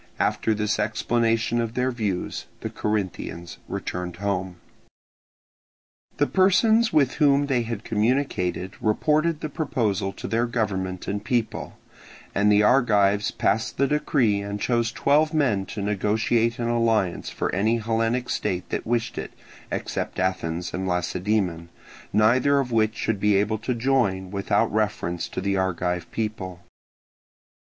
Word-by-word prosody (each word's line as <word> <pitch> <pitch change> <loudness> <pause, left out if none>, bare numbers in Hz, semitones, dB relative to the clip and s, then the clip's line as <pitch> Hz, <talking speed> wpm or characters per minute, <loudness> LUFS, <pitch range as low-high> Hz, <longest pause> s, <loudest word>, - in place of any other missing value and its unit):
After 110 - +1
this 105 0 -1
explanation 115 +2 +1
of 115 0 -4
their 130 +1 +1
views, 105 -7 -3
the - - -4
Corinthians 95 -5 -3
returned 90 -1 -4
home. 95 -1 -2 1.6
The 145 - +3
persons 220 +6 +4
with 140 -4 +2
whom 145 -1 +5
they 135 -4 +1
had 115 -2 -4
communicated 105 -5 0
reported 150 +8 +1
the - - -2
proposal 110 - -1
to - - -7
their 115 +1 +1
government 95 -6 -2
and 100 +1 -2
people, 115 0 -2 0.6
and 105 +1 +3
the 105 0 +5
Argives 105 -4 +3
passed 110 +1 0
the 140 - +3
decree 130 -7 +1
and 100 0 -4
chose 120 0 +1
twelve 155 +5 +2
men 110 -11 +1
to 110 -4 -5
negotiate 110 +3 +1
an 120 - -2
alliance 115 -6 +1
for - - -3
any 110 +5 +2
Hellenic 115 +2 0
state 90 -1 -2
that - - -3
wished 120 -1 -1
it, - - -6 0.4
except - - -3
Athens 90 -2 -2
and 95 +1 -2
Lacedaemon, 90 -1 -1 0.4
neither 125 +7 +4
of 130 -3 -2
which 110 -1 +2
should 110 -3 -1
be 105 0 +3
able 105 +2 +1
to 120 +2 -2
join 115 -7 +1
without 100 +1 +1
reference 105 -5 -1
to - - -4
the 100 0 0
Argive 90 -2 -1
people. 95 -5 -4
110 Hz, 140 wpm, -24 LUFS, 95-120 Hz, 1.6 s, whom